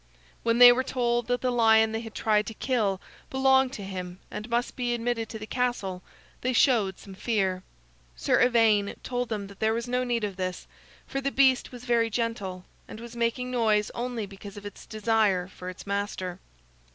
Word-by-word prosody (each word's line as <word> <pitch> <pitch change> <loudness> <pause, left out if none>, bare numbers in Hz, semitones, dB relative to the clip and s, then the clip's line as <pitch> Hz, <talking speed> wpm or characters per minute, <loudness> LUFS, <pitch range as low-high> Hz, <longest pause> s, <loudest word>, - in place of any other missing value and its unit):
When 230 0 +1
they 245 0 +11
were 255 +2 +2
told 240 -2 0
that 245 0 0
the 255 - +1
lion 220 -2 +5
they 225 - -2
had 225 -2 -10
tried 210 -1 +2
to 225 - -6
kill 210 -8 0 0.3
belonged 265 -1 +3
to 205 - -6
him 180 -2 -6
and 215 +3 -6
must 240 +2 -1
be 245 -2 -1
admitted 230 -1 -2
to 220 - -6
the 215 - -7
castle, 220 -7 -2 0.4
they 255 +1 0
showed 220 -7 +3
some 195 - -12
fear. 190 -3 0 0.5
Sir - - +2
Ivaine 225 -5 +3
told 245 -1 -2
them 210 -3 -3
that 200 0 -13
there 220 0 +2
was 235 +1 -3
no 250 +1 0
need 240 -2 -1
of 200 -2 -3
this, 185 -1 -3 0.4
for 275 - -3
the 275 - 0
beast 265 -2 +3
was 250 -1 -10
very 235 -2 +2
gentle, 205 -5 -3 0.2
and - - -9
was 235 0 -10
making 235 +2 -1
noise 215 -4 +2
only 240 -2 -3
because 200 +1 -11
of 205 - -9
its 205 - -9
desire 215 -4 +1
for 185 -1 -8
its 185 - -10
master. 200 -2 -3
225 Hz, 195 wpm, -27 LUFS, 200-245 Hz, 0.5 s, they